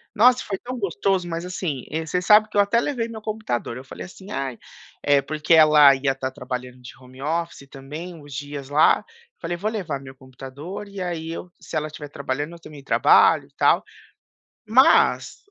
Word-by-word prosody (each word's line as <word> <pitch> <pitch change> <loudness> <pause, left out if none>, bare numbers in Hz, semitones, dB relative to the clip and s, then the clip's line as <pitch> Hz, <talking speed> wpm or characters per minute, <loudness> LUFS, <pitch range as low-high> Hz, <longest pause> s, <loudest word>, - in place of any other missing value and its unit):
Nossa, 250 +3 +5
foi 195 -2 -4
tão 250 +2 -7
gostoso, 190 -1 0
mas, 165 +1 -4
assim, 165 -8 -4
eh, 160 +1 -2
você 180 +3 -1
sabe 215 +2 +6
que 205 - -4
eu - - +7
até 205 +4 +2
levei 245 -6 -2
meu 220 -1 -8
computador, 210 - -3
eu 130 - -9
falei 130 - -9
assim: 190 +2 -13
"Ai" 130 -4 -3 0.5
eh, 145 -1 +4
porque 155 +3 0
ela 150 -3 +8
ia 135 0 0
estar 130 0 -4
trabalhando 125 -2 -7
de 125 - -11
home 130 +1 -15
office 165 -2 -3
também 150 +6 -8
uns 145 -3 -12
dias 145 0 -6
lá, 150 +2 +4 0.3
falei: 175 - -4
"Vou 210 +4 -2
levar 175 -11 -4
meu 135 0 -11
computador 135 +9 -9
e 200 -1 -9
aí 165 -2 -4
eu 175 +1 -7
se - - -9
ela 155 0 0
estiver 150 -1 -9
trabalhando, 145 +2 -4
eu 170 - -12
também 145 -4 -12
trabalho - - +4
e - - -32
tal", - - +3 0.9
mas 265 - +3
155 Hz, 195 wpm, -23 LUFS, 135-190 Hz, 0.9 s, ela